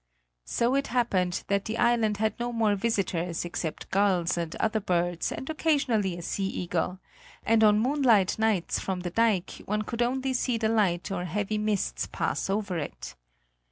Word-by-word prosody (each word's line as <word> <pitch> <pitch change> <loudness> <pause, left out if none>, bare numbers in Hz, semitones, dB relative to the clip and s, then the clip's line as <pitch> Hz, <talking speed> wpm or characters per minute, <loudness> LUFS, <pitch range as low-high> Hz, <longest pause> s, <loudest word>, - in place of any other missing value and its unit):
So 235 +2 +1
it 275 0 +1
happened 195 -8 0
that 200 0 0
the 220 +1 -3
island 230 -3 +2
had 220 +1 +1
no 240 0 -2
more 225 -3 +2
visitors 190 -6 -1
except 170 -2 -5
gulls 185 -3 +2
and 170 -2 -3
other 220 0 0
birds 175 -3 0
and 265 - -6
occasionally 260 - +1
a 175 - -7
sea 195 +3 -2
eagle; 180 0 -2 0.5
and 225 0 +4
on 210 -1 +6
moonlight 235 -6 +3
nights 215 -6 +1
from 185 -2 -3
the 175 -1 -4
dike 215 -3 +1
one 210 +1 0
could 230 +2 -4
only 260 +2 0
see 250 -1 0
the 220 -1 0
light 195 -6 +1
or 180 -2 -2
heavy 205 +4 -2
mists 210 -1 -1
pass - - -2
over 200 -3 -1
it. 145 - -6
210 Hz, 170 wpm, -27 LUFS, 180-230 Hz, 0.5 s, on